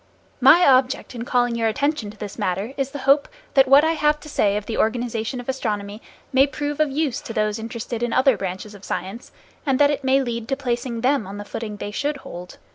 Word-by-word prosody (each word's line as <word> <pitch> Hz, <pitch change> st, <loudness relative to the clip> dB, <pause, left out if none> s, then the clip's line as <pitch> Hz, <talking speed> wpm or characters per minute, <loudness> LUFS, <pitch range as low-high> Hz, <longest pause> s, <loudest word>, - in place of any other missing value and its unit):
My 290 Hz, +8 st, +7 dB
object 260 Hz, 0 st, +3 dB
in 235 Hz, -1 st, -5 dB
calling 245 Hz, -1 st, +1 dB
your 230 Hz, -1 st, 0 dB
attention 280 Hz, 0 st, -1 dB
to 210 Hz, -, -12 dB
this 205 Hz, +1 st, -7 dB
matter 200 Hz, +4 st, -2 dB
is 275 Hz, -1 st, -2 dB
the 285 Hz, -, -7 dB
hope 280 Hz, +1 st, +4 dB, 0.3 s
that 270 Hz, -1 st, +5 dB
what 275 Hz, +3 st, +7 dB
I 320 Hz, -, +3 dB
have 300 Hz, -2 st, +1 dB
to 305 Hz, -, -10 dB
say 205 Hz, -7 st, +1 dB
of 210 Hz, -, -5 dB
the 225 Hz, -, -4 dB
organization 235 Hz, +1 st, -1 dB
of 245 Hz, -, -9 dB
astronomy 210 Hz, -5 st, -3 dB, 0.3 s
may 265 Hz, +2 st, +5 dB
prove 290 Hz, +1 st, -4 dB
of 305 Hz, -1 st, +3 dB
use 280 Hz, -2 st, -1 dB
to 225 Hz, -, -7 dB
those 215 Hz, 0 st, 0 dB
interested 230 Hz, +1 st, -5 dB
in 240 Hz, -1 st, -1 dB
other 260 Hz, +1 st, +4 dB
branches 190 Hz, +2 st, -5 dB
of 200 Hz, -1 st, -14 dB
science, 195 Hz, +7 st, -5 dB, 0.3 s
and 270 Hz, -3 st, +1 dB
that 290 Hz, +1 st, +5 dB
it 290 Hz, -1 st, -3 dB
may 265 Hz, +1 st, +3 dB
lead 235 Hz, -2 st, -4 dB
to 270 Hz, -, -1 dB
placing 240 Hz, -3 st, -2 dB
them 255 Hz, -4 st, +1 dB
on 200 Hz, +1 st, -7 dB
the 205 Hz, -, -7 dB
footing 210 Hz, -1 st, -6 dB
they 205 Hz, -, -5 dB
should 285 Hz, +7 st, -2 dB
hold. 180 Hz, -8 st, -10 dB
245 Hz, 230 wpm, -22 LUFS, 215-275 Hz, 0.3 s, My